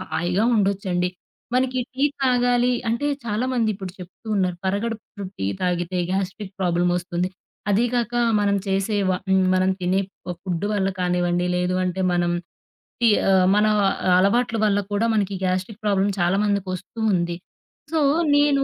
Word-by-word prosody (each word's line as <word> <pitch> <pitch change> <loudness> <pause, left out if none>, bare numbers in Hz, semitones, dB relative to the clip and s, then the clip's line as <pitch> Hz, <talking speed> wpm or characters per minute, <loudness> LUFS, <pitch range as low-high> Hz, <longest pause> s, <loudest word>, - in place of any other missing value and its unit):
హాయిగా 180 +2 -1
ఉండొచ్చండి. 190 -3 0 0.5
మనకి 255 0 +1 0.2
టీ 270 +2 +1 0.2
తాగాలి 245 -1 +3 0.2
అంటే 235 +6 0 0.2
చాలామంది 235 +1 0
ఇప్పుడు 190 -2 -7
చెప్తూ 180 +4 -12
ఉన్నారు 180 -2 0
పరగడుపున 205 +1 -3
టీ 95 - -1
తాగితే 180 0 -1
గ్యాస్ట్రిక్ 190 +1 -3
ప్రాబ్లమొస్తుంది. 175 0 0 0.4
అదీ 205 +4 +3
కాక 240 -1 -1 0.3
మనం 200 -1 +2
చేసే 195 +2 0
వ - - +3 0.2
హ్మ్. 190 0 +4
మనం 185 0 +3
తినే 185 +2 +1 0.3
ప 180 - -2
ఫుడ్డు 185 +1 -2
వల్ల 195 -2 +1
కానివ్వండి, 175 0 +1
లేదు 180 +1 0
అంటే 185 +1 -2
మనం 175 0 +1 0.7
టీ 235 - +5 0.2
ఆహ్, 190 -1 +5
మన 210 +1 +4 0.5
అలవాట్లు 225 +5 +2
వల్ల 205 -1 +2
కూడా 205 +3 +1
మనకి 200 -2 0
గాస్ట్రిక్ 185 +4 -2
ప్రాబ్లమ్ 200 0 +2
చాలామందికి 195 +2 +1
వస్తూ 205 +5 -8
ఉంది. 170 -1 0 0.6
సో 320 - +1 0.3
నేను 290 -1 +3
195 Hz, 140 wpm, -23 LUFS, 180-220 Hz, 0.7 s, టీ